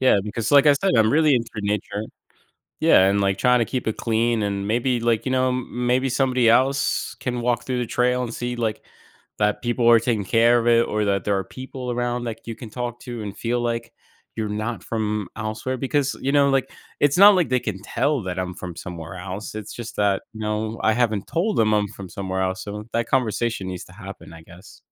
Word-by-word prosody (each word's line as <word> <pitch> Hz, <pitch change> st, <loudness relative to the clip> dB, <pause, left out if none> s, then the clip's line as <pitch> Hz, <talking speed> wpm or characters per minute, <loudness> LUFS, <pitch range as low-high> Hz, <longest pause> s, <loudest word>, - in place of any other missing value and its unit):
Yeah, 130 Hz, -5 st, +5 dB
because 105 Hz, +2 st, -3 dB
like, 145 Hz, 0 st, +6 dB
I 145 Hz, -, +8 dB
said, 145 Hz, +6 st, +1 dB
I'm 110 Hz, +2 st, +4 dB
really 155 Hz, -2 st, +4 dB
into 115 Hz, -1 st, -1 dB
nature. 105 Hz, 0 st, -2 dB, 0.8 s
Yeah, 95 Hz, -, +5 dB
and, 100 Hz, +1 st, +2 dB
like, 95 Hz, -1 st, +1 dB
trying 125 Hz, +2 st, +3 dB
to 115 Hz, -, +2 dB
keep 130 Hz, -, -3 dB
it 110 Hz, -, -2 dB
clean 115 Hz, -1 st, +1 dB
and 100 Hz, -1 st, -2 dB
maybe, 120 Hz, +3 st, +1 dB
like, 115 Hz, +1 st, 0 dB
you 130 Hz, -, 0 dB
know, 130 Hz, 0 st, +2 dB
m 125 Hz, -1 st, -3 dB
maybe 130 Hz, +2 st, +2 dB
somebody 125 Hz, -2 st, +2 dB
else 130 Hz, +3 st, +2 dB
can 125 Hz, -2 st, -3 dB
walk 120 Hz, 0 st, 0 dB
through 125 Hz, -1 st, -2 dB
the 120 Hz, -, -2 dB
trail 125 Hz, +2 st, +1 dB
and 120 Hz, -2 st, -4 dB
see, 120 Hz, +1 st, -4 dB
like, 110 Hz, -2 st, -2 dB, 0.6 s
that 105 Hz, 0 st, +1 dB
people 120 Hz, 0 st, +1 dB
are 115 Hz, -, +8 dB
taking 115 Hz, -3 st, -1 dB
care 115 Hz, +4 st, +4 dB
of 115 Hz, -, -2 dB
it 115 Hz, 0 st, +4 dB
or 105 Hz, 0 st, -1 dB
that 100 Hz, -1 st, 0 dB
there 100 Hz, -1 st, +1 dB
are 95 Hz, -, -2 dB
people 130 Hz, +3 st, -7 dB
around 120 Hz, 0 st, -2 dB
that 115 Hz, -1 st, -6 dB
you 115 Hz, -, -4 dB
can 110 Hz, -2 st, -10 dB
talk 120 Hz, 0 st, -4 dB
to 120 Hz, -3 st, -6 dB
and 100 Hz, -2 st, -6 dB
feel 120 Hz, +1 st, -1 dB
like 115 Hz, -1 st, -3 dB, 0.4 s
you're 110 Hz, -2 st, -2 dB
not 110 Hz, +3 st, -3 dB
from 105 Hz, -2 st, -2 dB
elsewhere 110 Hz, +4 st, -3 dB
because, 135 Hz, +1 st, 0 dB
you 135 Hz, -, 0 dB
know, 140 Hz, -1 st, +4 dB
like, 135 Hz, -1 st, +1 dB, 0.3 s
it's 145 Hz, +3 st, +3 dB
not 200 Hz, +1 st, +9 dB
like 180 Hz, -6 st, +1 dB
they 130 Hz, -1 st, +2 dB
can 100 Hz, -4 st, -5 dB
tell 130 Hz, +5 st, 0 dB
that 95 Hz, -1 st, -4 dB
I'm 90 Hz, -1 st, -3 dB
from 90 Hz, -2 st, -7 dB
somewhere 85 Hz, 0 st, -7 dB
else, 95 Hz, +4 st, -6 dB
it's 110 Hz, -1 st, -7 dB
just 120 Hz, -1 st, -8 dB
that, 100 Hz, -2 st, +1 dB
no, 110 Hz, 0 st, -3 dB
I 110 Hz, -, +3 dB
haven't 110 Hz, -4 st, 0 dB
told 180 Hz, +8 st, -1 dB
them 110 Hz, -1 st, +3 dB
I'm 105 Hz, -1 st, +1 dB
from 100 Hz, -2 st, -10 dB
somewhere 95 Hz, +1 st, -4 dB
else, 95 Hz, +3 st, -2 dB
so 105 Hz, +1 st, -6 dB
that 115 Hz, 0 st, 0 dB
conversation 120 Hz, -5 st, 0 dB
needs 90 Hz, -1 st, -6 dB
to -, -, -16 dB
happen, -, -, -10 dB
I 80 Hz, -, -11 dB
guess. 90 Hz, +5 st, -15 dB
115 Hz, 225 wpm, -23 LUFS, 105-125 Hz, 0.8 s, not